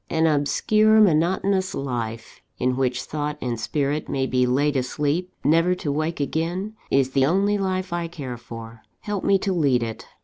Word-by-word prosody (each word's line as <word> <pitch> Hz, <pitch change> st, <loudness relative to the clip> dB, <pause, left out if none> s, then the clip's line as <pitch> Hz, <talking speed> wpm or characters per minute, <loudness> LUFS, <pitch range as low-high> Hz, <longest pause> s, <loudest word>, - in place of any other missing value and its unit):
An 160 Hz, 0 st, +2 dB
obscure, 215 Hz, +9 st, +3 dB
monotonous 190 Hz, +1 st, +2 dB
life, 115 Hz, -4 st, -5 dB, 0.2 s
in 125 Hz, +1 st, 0 dB
which 130 Hz, -1 st, 0 dB
thought 150 Hz, +1 st, -3 dB
and 120 Hz, -4 st, -3 dB
spirit 145 Hz, +5 st, -1 dB
may 135 Hz, -1 st, 0 dB
be 125 Hz, -1 st, +1 dB
laid 140 Hz, +4 st, +1 dB
asleep, 145 Hz, +7 st, -1 dB
never 165 Hz, +4 st, +3 dB
to 150 Hz, -5 st, -3 dB
wake 155 Hz, +3 st, -2 dB
again, 170 Hz, +8 st, -2 dB, 0.2 s
is 135 Hz, -1 st, +2 dB
the 135 Hz, 0 st, +3 dB
only 200 Hz, +5 st, +2 dB
life 185 Hz, -2 st, -2 dB
I 170 Hz, -1 st, -2 dB
care 140 Hz, -7 st, -6 dB
for. 115 Hz, -1 st, -10 dB, 0.2 s
Help 205 Hz, -2 st, -3 dB
me 195 Hz, -, +4 dB
to 195 Hz, 0 st, -1 dB
lead 140 Hz, -8 st, +2 dB
it. 115 Hz, -1 st, -6 dB
150 Hz, 170 wpm, -23 LUFS, 130-180 Hz, 0.2 s, me